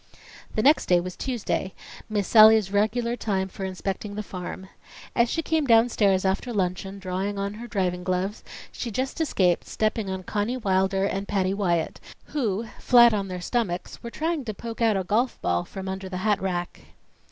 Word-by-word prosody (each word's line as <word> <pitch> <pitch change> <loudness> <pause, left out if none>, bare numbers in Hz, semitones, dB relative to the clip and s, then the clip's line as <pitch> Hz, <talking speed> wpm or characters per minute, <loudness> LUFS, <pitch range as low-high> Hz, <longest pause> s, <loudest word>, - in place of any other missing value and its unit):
The 215 - +1
next 295 +4 +4
day 180 -1 +5
was 180 +1 -5
Tuesday, 230 -6 -3 0.3
Miss 205 -3 -1
Sallie's 215 -3 +7
regular 230 +4 +1
time 195 -5 -1
for 190 0 -6
inspecting 195 +2 -4
the 210 - -3
farm. 185 0 -7 0.5
As 235 0 +3
she 325 - -1
came 315 -3 0
downstairs 225 -5 +4
after 195 +6 0
luncheon 190 -1 -2
drawing 195 +1 -3
on 200 +1 -2
her 230 +3 -8
driving 180 -5 -1
gloves, 185 +3 -2 0.3
she 240 - -5
just 260 +8 -3
escaped 185 - +1
stepping 215 -2 -1
on 190 0 -4
Conny 210 +6 -1
Wilder 190 -3 +1
and 195 0 -2
Patty 190 -2 0
Wyatt 175 -5 0 0.3
who, 230 -7 -1
flat 240 -2 +6
on 200 -2 -1
their 180 -1 -5
stomachs, 185 -4 -2
were 235 - -6
trying 320 +3 -2
to 215 -3 -4
poke 230 +2 -7
out 220 -3 +3
a 190 - -1
golf 230 +7 0
ball 85 0 0
from 190 -1 -7
under 190 0 -5
the 185 - -4
hat 210 -2 +2
rack. 175 -2 -3
200 Hz, 180 wpm, -25 LUFS, 190-230 Hz, 0.5 s, Sallie's